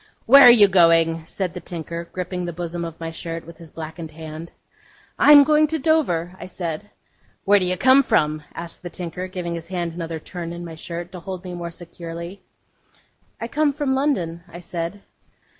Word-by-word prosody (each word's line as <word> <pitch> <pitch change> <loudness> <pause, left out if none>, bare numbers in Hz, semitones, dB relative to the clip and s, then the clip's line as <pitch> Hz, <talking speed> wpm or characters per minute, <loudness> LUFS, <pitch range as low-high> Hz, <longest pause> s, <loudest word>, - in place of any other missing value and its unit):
'Where 275 +4 +9
are 245 - +11
you 215 -4 +7
going?' 165 -3 +4
said 180 +1 -4
the 180 - -6
tinker, 170 -1 -6
gripping 180 0 -4
the 175 - -4
bosom 170 0 -4
of 165 -1 -7
my 165 0 -5
shirt 165 0 -6
with 170 0 -13
his 165 -2 -11
blackened 160 +1 -8
hand. 160 +1 -9 0.7
'I - - +7
am 290 -1 +10
going 305 +1 +4
to 320 +2 -1
Dover,' 260 - +1
I 180 - -7
said. 180 +2 -5 0.6
'Where 205 +1 +5
do 185 - -1
you 180 0 -1
come 260 +6 +6
from?' 155 - +1
asked 170 0 -7
the 175 - -7
tinker, 180 +1 -6
giving 180 -2 -5
his 165 -1 -6
hand 175 -2 -3
another 165 -1 -5
turn 170 +1 -7
in 175 0 -7
my 165 - -8
shirt, 170 +2 -7
to 185 - -8
hold 185 0 -7
me 180 -1 -7
more 170 -1 -5
securely. 170 +2 -9 1.0
'I 230 - -4
come 295 +2 +1
from 285 -2 -1
London,' 185 - -1
I 170 - -9
said. 175 +3 -5
175 Hz, 195 wpm, -22 LUFS, 165-190 Hz, 1.0 s, are